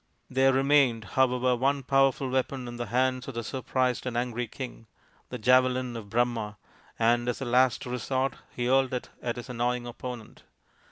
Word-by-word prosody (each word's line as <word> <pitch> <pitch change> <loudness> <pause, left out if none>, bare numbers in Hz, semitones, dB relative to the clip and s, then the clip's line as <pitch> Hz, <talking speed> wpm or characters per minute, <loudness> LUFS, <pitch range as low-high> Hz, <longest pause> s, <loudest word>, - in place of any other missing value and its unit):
There 135 +1 +4
remained, 135 -4 +3
however, 125 -1 +3
one 135 +3 +1
powerful 135 0 +2
weapon 130 0 -1
in 120 0 -7
the 120 -1 -4
hand 130 +3 0
of 135 - -6
the 115 - -3
surprised 130 0 -1
and 120 -2 -2
angry 120 0 -2
king 120 -1 -8 0.4
the 125 - -5
javelin 125 +1 +3
of 110 -3 -7
Brahma 115 -2 0 0.4
and 120 +1 +2
as 120 - -2
a 135 - -4
last 125 +1 +3
resort 130 +1 -1 0.2
he 120 - -4
hurled 130 0 +3
it 125 - -5
at 120 -1 -2
his 120 - -7
annoying 125 0 -1
opponent. 120 -1 -8
125 Hz, 170 wpm, -28 LUFS, 120-130 Hz, 0.4 s, There